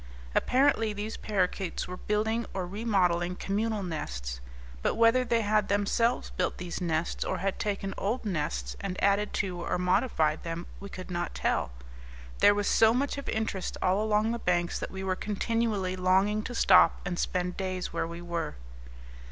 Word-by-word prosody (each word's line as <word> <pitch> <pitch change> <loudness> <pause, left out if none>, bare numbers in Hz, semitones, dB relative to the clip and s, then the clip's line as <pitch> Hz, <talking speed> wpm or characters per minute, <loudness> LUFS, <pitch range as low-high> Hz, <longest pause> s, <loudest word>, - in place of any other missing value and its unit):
Apparently 255 -5 +3
these 210 +2 -4
parakeets 190 -3 -1
were 180 - -5
building 220 +4 -1
or 185 -2 -1
remodelling 180 -3 +1
communal 210 +2 -1
nests; 60 - -4 0.4
but - - +1
whether 230 +3 +5
they 235 -2 +1
had 210 -1 +2
themselves 205 +4 +1
built 180 - -1
these 180 +1 -5
nests, 165 -1 -1
or - - -2
had 195 +1 -2
taken 195 -2 -2
old 225 +5 -1
nests 65 - -2
and 185 -2 -4
added 200 +1 +3
to 180 -3 -2
or - - -1
modified 180 -4 +1
them, 165 +1 -5
we 200 - -8
could 185 -1 -8
not 175 0 -3
tell. - - 0 0.7
There 205 - +6
was 205 0 0
so 225 +1 +5
much 280 +2 0
of 280 - -6
interest 220 -4 -2
all 190 +3 +2
along 215 +1 +2
the 235 - -2
banks 175 -3 0
that - - -4
we 190 0 -6
were 190 -1 0
continually 210 -2 -1
longing 190 +3 +2
to 245 - -5
stop 190 -4 +6
and 180 -1 -2
spend 180 0 -1
days 185 -1 -3
where - - -1
we 170 +1 -7
were. 170 - -3
195 Hz, 170 wpm, -29 LUFS, 180-215 Hz, 0.7 s, There